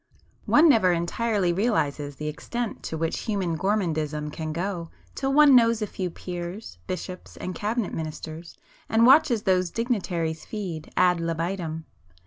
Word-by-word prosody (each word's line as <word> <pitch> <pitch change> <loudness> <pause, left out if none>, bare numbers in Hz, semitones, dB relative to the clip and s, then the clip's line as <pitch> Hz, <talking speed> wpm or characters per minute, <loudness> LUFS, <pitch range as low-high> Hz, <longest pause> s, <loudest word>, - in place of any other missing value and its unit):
One 315 +3 +6
never 220 - +5
entirely 180 +2 0
realises 150 - 0
the 150 +2 -5
extent 235 +9 -4
to 160 - -3
which 165 0 -1
human 195 -6 -1
gourmandism 155 -6 -1
can 155 -1 -4
go 170 0 -3 0.2
till 270 0 -1
one 290 -1 +7
knows 230 -2 +4
a - - +1
few 185 -2 -4
peers, 175 +4 -7
bishops 185 -1 -6
and 185 - -5
cabinet 215 +3 -2
ministers, 160 +1 -6 0.3
and 225 +1 +4
watches 250 -4 +5
those 185 -2 +2
dignitaries 175 -8 -2
feed 180 -8 -6
ad 180 -1 +4
libitum. 165 -1 -3
180 Hz, 140 wpm, -25 LUFS, 165-215 Hz, 0.3 s, one